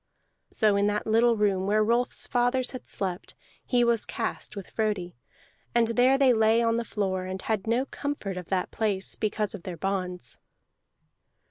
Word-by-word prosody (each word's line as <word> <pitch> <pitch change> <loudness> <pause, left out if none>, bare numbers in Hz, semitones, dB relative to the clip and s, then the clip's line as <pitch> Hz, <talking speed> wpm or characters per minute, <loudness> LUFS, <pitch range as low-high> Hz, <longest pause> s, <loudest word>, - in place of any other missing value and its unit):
So 215 -3 +3
in 200 +1 +2
that 210 0 -1
little 230 +1 +3
room 195 -2 +1
where 215 +1 +3
Rolf's 235 +3 +1
fathers 245 +1 +1
had 255 - -8
slept 185 -2 -4 0.3
he 245 -1 +2
was 235 -2 +1
cast - - -3
with 200 -2 -8
Frodi, 205 -5 -2 0.6
and 230 -1 +4
there 250 +3 +4
they 270 -2 +5
lay 220 0 +4
on 230 0 +2
the 235 - -1
floor, 190 -4 -2
and 185 +1 -4
had 215 0 -2
no 240 +4 +2
comfort 280 -10 -4
of 180 -2 -6
that 185 -2 -1
place 205 -3 -1
because 215 -1 -1
of 205 - -7
their 175 -1 -6
bonds. 180 -6 -3
215 Hz, 170 wpm, -27 LUFS, 190-235 Hz, 0.6 s, they